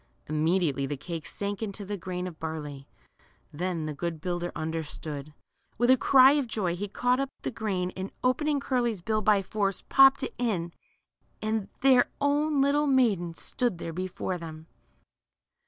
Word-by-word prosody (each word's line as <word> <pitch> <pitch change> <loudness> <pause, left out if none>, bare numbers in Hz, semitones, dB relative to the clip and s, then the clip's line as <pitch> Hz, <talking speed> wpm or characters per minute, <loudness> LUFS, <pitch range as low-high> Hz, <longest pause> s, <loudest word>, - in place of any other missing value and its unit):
Immediately 155 -2 +1
the 145 - -3
cake 165 +2 -6
sank 200 0 -4
again 220 - -2
into 200 +1 -7
the 205 +1 -3
grain 180 0 -4
of 175 -3 -7
barley. 150 -4 -6 0.7
Then 170 0 -2
the 155 - -3
good 165 +2 -4
builder 175 +1 -3
understood. 155 -2 -5 0.5
With 240 +2 +4
a - - +8
cry 260 +1 +7
of 285 -3 +1
joy 190 -6 -1
he 205 +3 -4
caught 245 +5 +1
up 275 -1 -1
the - - -2
grain, 195 -6 -2
and 190 +1 -5
open 255 +4 +2
ing 295 -2 +2
Curly's 240 -7 0
bill 215 +4 0
by 205 -2 +3
force, 195 -1 -1
popped 270 0 +7
it - - -3
in, 180 -9 -1 0.7
and 215 -2 -2
— - - -38
their 260 -2 +5
own 290 0 +2
little 290 +2 +3
maiden 210 -11 +2
stood 240 -1 -2
there 165 -1 -5
before 185 +1 -3
them 160 -1 -8
190 Hz, 170 wpm, -28 LUFS, 165-245 Hz, 0.7 s, a